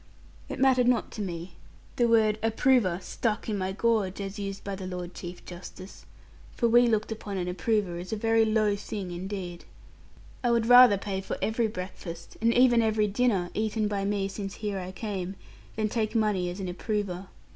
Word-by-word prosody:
It - - -4
mattered 255 -2 +4
not 250 -1 +2
to 215 - -6
me. 175 -2 -5 0.4
The 240 - +4
word 220 -2 +3
'approver' 225 -5 +2
stuck 220 +2 -2
in 215 - -1
my 190 -1 -2
gorge, 210 -2 0
as 200 +1 -5
used 195 -1 -5
by 200 - -4
the 190 -1 -6
Lord 180 -1 -5
Chief 175 0 -8
Justice; 185 +2 -10 0.5
for 235 - +2
we 240 +1 +6
looked 220 -1 0
upon 210 -3 -5
an 180 -1 -2
approver 180 0 0
as 180 +4 -7
a - - 0
very 225 +1 +3
low 215 -2 +2
thing 200 -2 -5
indeed. 180 -1 -5 0.8
I 240 - +2
would 235 -1 +2
rather 245 -3 +8
pay 195 -1 -3
for - - -4
every 225 +1 +1
breakfast, 180 -4 -7
and 230 +1 +4
even 240 -1 +5
every 215 -1 +2
dinner, 205 -4 +1
eaten 215 0 0
by 200 -1 -2
me 200 -1 0
since 195 0 -6
here 205 -2 -3
I 185 0 -6
came, 190 -2 -4 0.4
than 215 -1 0
take 215 0 -2
money 210 -5 +1
as 180 +3 -6
an 190 - -3
approver. 190 0 -3
205 Hz, 190 wpm, -28 LUFS, 185-225 Hz, 0.8 s, rather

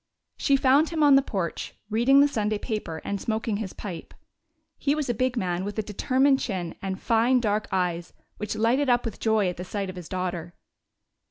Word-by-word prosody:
She 280 - +2
found 275 +3 +4
him 320 -2 0
on 290 -1 +7
the 275 - +7
porch, 190 -10 -4 0.2
reading 250 +6 +5
the 285 - +6
Sunday 215 -5 -1
paper 205 -8 -4
and 200 -1 -3
smoking 220 -1 -1
his 205 -3 -4
pipe. 175 -6 -8 0.6
He 285 +1 +1
was 295 -5 -1
a - - -1
big 255 +2 -1
man 180 -3 -1
with 205 +2 -5
a 215 - 0
determined 265 +6 +2
chin 180 -7 -3
and 190 -1 -4
fine 235 +3 +3
dark 210 -2 0
eyes 175 -2 -1 0.3
which 210 0 -4
lighted 245 +6 +2
up 245 0 +3
with 225 - -5
joy 220 -3 +2
at 180 - -3
the 180 - -5
sight 195 0 -4
of - - -14
his 180 -3 -9
daughter. 175 -2 -4
215 Hz, 200 wpm, -26 LUFS, 185-255 Hz, 0.6 s, on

